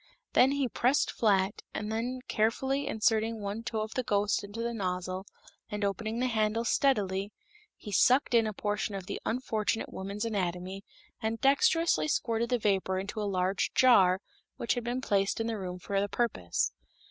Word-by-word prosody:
These 265 +2 +5
he 280 -2 +1
pressed 255 +4 +2
flat, 200 -3 +1
and 210 +1 -3
then 245 +3 -2
carefully 265 +6 0
inserting 220 -1 +1
one 205 +2 -4
toe 230 -1 -3
of 215 +1 -4
the 255 - 0
ghost 205 -3 +1
into 205 +3 -5
the 235 0 -2
nozzle 185 -2 -3 0.4
and 210 0 -2
opening 215 +3 -2
the 250 - +1
handles 225 -1 +1
steadily, 205 -7 +1 0.5
he 210 - -9
sucked 250 +7 +4
in 230 -2 +4
a - - -1
portion 205 0 -2
of 190 -2 -5
the 200 - -5
unfortunate 225 -2 -1
woman's 200 +3 -4
anatomy, 190 -2 -3 0.4
and 225 +1 -2
dexterously 330 +4 +3
squirted 235 -5 0
the 250 - +2
vapor 195 -3 +1
into 200 +3 -4
a 205 - -1
large 185 0 0
jar, 190 -8 +6 0.4
which 235 - 0
had 245 - -3
been 245 +2 -2
placed 200 -4 +1
in 225 - -1
the 225 -2 -2
room 180 -1 -5
for 195 +2 -1
the 205 - -1
purpose. 200 - 0
215 Hz, 175 wpm, -30 LUFS, 195-235 Hz, 0.5 s, jar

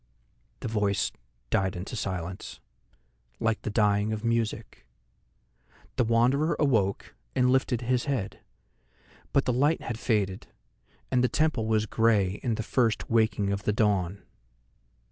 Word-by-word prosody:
The - - -3
voice 105 -2 0 0.4
died 95 -1 +1
into 90 +6 -6
silence, 95 -4 -5 0.8
like 115 -1 0
the - - -3
dying 105 0 +2
of 110 0 -3
music. 115 -1 -2 1.1
The 125 - +2
Wanderer 125 +8 +2
awoke 110 -10 +1 0.2
and 125 0 +3
lifted 130 -2 +1
his 125 0 0
head, 130 -9 -2 0.9
but 140 - +2
the 125 - +1
light 145 +6 +2
had 115 -1 -4
faded, 100 -6 -1 0.6
and 125 -1 +3
the 125 - +3
temple 155 -8 +1
was 110 -1 +2
grey 105 -3 +2
in 115 -3 0
the 110 - -3
first 115 0 0
waking 110 -3 +2
of 100 0 -2
the 105 - 0
dawn. 100 -3 0
110 Hz, 135 wpm, -27 LUFS, 100-125 Hz, 1.1 s, and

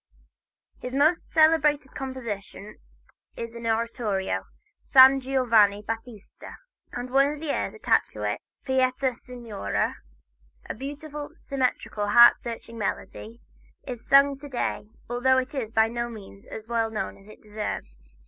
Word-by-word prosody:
His 250 +1 -6
most 310 +5 +2
celebrated 305 -3 +3
composition 215 -6 -7 0.6
is 230 0 -6
an 235 0 -6
oratorio, 225 -3 -1 0.4
"San 265 0 +7
Giovanni 230 -6 +3
Battista," 225 -1 -8 0.4
and 250 +1 -6
one 275 +2 +4
of 300 - -9
the 310 -2 -2
airs - - -2
attached 440 - +1
to - - -7
it - - -2 0.2
"Pietà 260 0 +1
Signore," 235 - -4 0.7
a - - -3
beautiful, 290 +4 -7
symmetrical, 255 -6 -2
heart 235 +3 +7
searching 230 -1 -8
melody, 220 +2 -5 0.4
is 245 -3 -7
sung 275 0 +5
to 290 +1 -10
day, 240 -4 -3 0.2
although 245 +2 +2
it 260 +1 -1
is 255 -6 -3
by 220 0 +3
no 235 +1 -3
means 200 -3 -12
as 220 - -8
well 230 -1 0
known 220 - -4
as 195 - -19
it 215 - -15
deserves. 135 - -6
240 Hz, 140 wpm, -26 LUFS, 220-270 Hz, 0.7 s, San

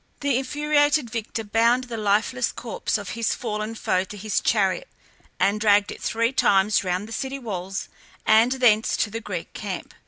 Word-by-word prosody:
The 280 -3 +1
infuriated 290 -1 +1
victor 225 -1 -4
bound 230 +4 +2
the 245 -2 -6
lifeless 215 +4 +1
corse 235 -1 -3
of 205 -3 -7
his 230 -1 -1
fallen 215 -1 -4
foe 185 -4 0
to 205 - -10
his 210 +1 -1
chariot, 210 - +1 0.5
and 205 +2 +2
dragged 205 -1 +4
it - - -9
three 230 +3 0
times 205 -3 +3
round 185 +2 -2
the - - -12
city 265 +3 -3
walls 195 -6 -5 0.4
and 225 +3 +5
thence 230 -4 +3
to 210 - 0
the 225 +1 -4
Greek 185 -6 -6
camp. 195 -4 -6
220 Hz, 175 wpm, -24 LUFS, 205-245 Hz, 0.5 s, and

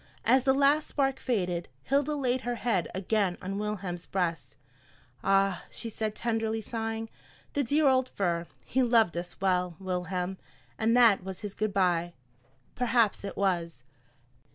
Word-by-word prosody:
As 255 +2 +4
the 265 - +5
last 285 +2 +3
spark 270 -2 0
faded, 180 -8 -1 0.2
Hilda 285 +2 +1
laid 255 -3 0
her 245 -1 -2
head 225 -7 0
again 195 -1 0
on 195 +2 -4
Wilhelm's 195 -5 -4
breast. 165 -9 -2 0.7
"Ah!" 195 -1 +2
she 230 - -6
said, 215 0 -3
tenderly 225 -1 -1
sighing, 225 0 -4 0.5
"the 285 - +1
dear 290 +4 +3
old 260 -1 +3
fir! 170 -3 -1 0.2
He 260 - +1
loved 230 -7 +4
us 175 +1 -5
well, 180 -2 +1
Wilhelm, 185 0 -3 0.4
and 230 +2 +3
that 225 -6 +6
was 190 -1 -7
his 205 -2 -5
'good 215 0 -1
by.'" 175 -3 +1 0.6
Perhaps 235 -4 +2
it 200 - -6
was! 170 -8 -1
205 Hz, 150 wpm, -29 LUFS, 180-240 Hz, 0.7 s, that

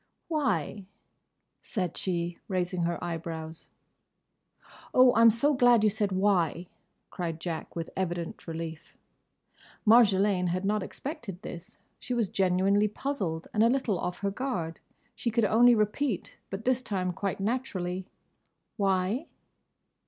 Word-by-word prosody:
"Why?" 210 - -1 0.7
said 180 -6 -3
she, 175 -2 -2
raising 180 -2 -1
her 170 0 -1
eyebrows. 165 -1 -5 1.3
"Oh, 255 -1 +7
I'm 230 +1 +8
so 235 +7 +2
glad 245 -4 +5
you 215 - +4
said 205 -1 -1
'Why?'" 185 -3 +1 0.5
cried 165 -2 -4
Jack, 165 -1 -5
with 165 -1 -4
evident 175 -3 -3
relief. 160 -1 -6 0.9
Marjolaine 205 -4 +5
had 185 +2 -1
not 210 +1 +1
expected 215 - -6
this. 170 - -9 0.2
She 250 - -3
was 225 -5 +1
genuinely 195 +2 +2
puzzled 200 - -3
and 215 - +2
a 230 - +6
little 240 -8 0
off 180 - -3
her 200 0 0
guard. 190 -9 -3 0.3
She 235 - -2
could 230 -1 +2
only 235 +4 +6
repeat, 215 +1 -1
but 195 +3 -6
this 255 0 +2
time 185 -6 -2
quite 195 +1 -3
naturally, 195 -5 -2 0.7
"Why?" 195 - +1
195 Hz, 130 wpm, -29 LUFS, 175-230 Hz, 1.3 s, I'm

